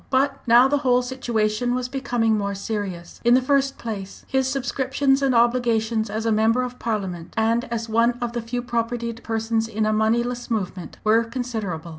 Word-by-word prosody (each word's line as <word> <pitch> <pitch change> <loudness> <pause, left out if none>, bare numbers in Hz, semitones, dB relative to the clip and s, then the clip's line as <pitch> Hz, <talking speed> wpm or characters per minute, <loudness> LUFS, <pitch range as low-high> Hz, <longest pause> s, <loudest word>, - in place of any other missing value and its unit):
But 275 +1 +1
now 240 +3 +7
the 285 +1 +1
whole 250 -2 +3
situation 245 -2 -1
was 250 -1 -2
becoming 245 -4 0
more 200 -1 -2
serious. 195 -4 -5
In 240 +1 +5
the - - +6
first 275 +1 +1
place, 200 -4 -7
his 265 -1 +1
subscriptions 270 +1 0
and 270 -2 +2
obligations 230 -2 +2
as 220 +2 -3
a 225 - +2
member 220 +3 +3
of 250 0 -6
Parliament, 190 -7 -4
and 230 +2 +2
as 230 -1 -4
one 230 +2 +3
of 240 -2 -3
the 240 - -2
few 240 +2 -4
propertied 235 -1 -2
persons 225 0 -1
in 220 -1 -1
a 215 - +2
moneyless 235 +3 0
movement, 190 -5 -3
were 220 +2 +4
considerable. 220 -9 -4
230 Hz, 180 wpm, -23 LUFS, 220-250 Hz, -, now